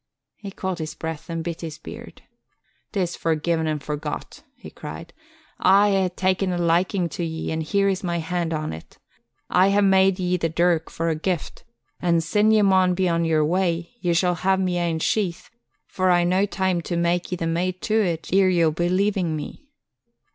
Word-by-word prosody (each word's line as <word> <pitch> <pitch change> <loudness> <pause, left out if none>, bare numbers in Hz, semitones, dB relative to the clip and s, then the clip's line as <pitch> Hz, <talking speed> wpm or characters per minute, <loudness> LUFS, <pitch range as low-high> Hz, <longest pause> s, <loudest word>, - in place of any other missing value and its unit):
He 205 - -8
caught 190 -2 -4
his 155 -1 -5
breath 160 -1 -6
and 165 -1 -3
bit 170 -1 -5
his 160 -2 -6
beard. - - -11 0.7
"'Tis 180 -5 -1
forgi'en 160 0 0
an' 155 -1 0
forgot," 150 +1 -6
he - - -12
cried. - - -9 0.5
"I 200 +2 +5
hae 190 -2 +2
ta'en 185 +1 0
a 175 - -1
likin' 175 +2 +1
to 175 - -4
ye 160 -1 -4
an' 160 0 -2
here's 195 +4 0
my 170 -1 -1
hand 170 0 -2
on't. 155 - -5 0.5
I 185 +2 +5
hae 200 +1 +3
made 190 -1 +4
ye 180 -1 0
the 165 -1 -1
dirk 170 0 +1
for 165 0 -2
a 160 - 0
gift 170 +1 -3 0.4
an' 170 -2 +2
sin 210 +5 +2
ye 215 -1 +4
maun 185 -2 +4
be 185 0 +1
on 170 -1 +1
your 155 -2 +2
way, 170 +1 -1
ye 175 -5 0
shall 180 +1 +2
hae 190 +3 +1
my 185 -1 0
ane 170 -2 0
sheath, 180 +1 -1 0.3
for 185 0 0
I've 175 -1 +3
no 185 +1 +2
the 205 - +2
time 190 -2 0
to 170 +1 -3
mak' 170 +1 0
ye - - 0
the 170 - -3
mate 175 +3 -1
to 220 -1 +2
it 170 -2 -3
e'er 190 -1 +5
ye'll 170 -3 +3
be 175 +3 -1
leavin' 185 -3 +1
me." 215 - -8
175 Hz, 195 wpm, -23 LUFS, 165-190 Hz, 0.7 s, I